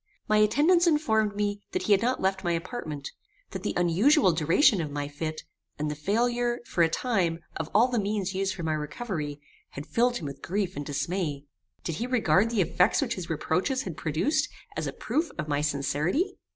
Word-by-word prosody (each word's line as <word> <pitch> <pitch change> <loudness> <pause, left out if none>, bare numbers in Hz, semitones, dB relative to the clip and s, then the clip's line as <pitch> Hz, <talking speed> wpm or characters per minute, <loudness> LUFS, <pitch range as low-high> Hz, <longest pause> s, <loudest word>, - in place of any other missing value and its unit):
My 215 - +3
attendants 295 - +4
informed 220 -10 +2
me 205 0 -1
that - - -1
he - - -1
had 200 -1 +5
not 250 +2 +1
left 190 0 0
my 175 - +1
apartment; 165 - -5 0.4
that - - -5
the - - -2
unusual 185 - +4
duration 170 - +4
of 155 - -3
my 145 0 -3
fit, 155 +2 -5 0.3
and 150 0 -2
the - - -4
failure, 240 +8 0
for 175 - -1
a 165 - +5
time, 180 -5 0 0.2
of 160 -1 -4
all 225 +5 +5
the 245 -2 0
means 200 -2 -1
used 190 0 -1
for 175 - -6
my 160 -1 0
recovery, 150 -1 -4 0.3
had 145 - -6
filled 240 +9 +1
him 160 - -7
with 140 -1 -7
grief 195 0 -2
and 145 0 -5
dismay. 150 -1 -2 0.4
Did 165 - -3
he 235 - -2
regard 220 -5 +3
the 230 -4 +1
effect 180 +2 +2
which 255 -5 0
his 180 -3 -6
reproaches 180 - 0
had 180 -5 -5
produced 275 - 0 0.3
as - - -2
a - - -2
proof 315 +2 -1
of 155 -2 -3
my 145 -1 0
sincerity? 155 - 0
190 Hz, 200 wpm, -27 LUFS, 155-235 Hz, 0.4 s, had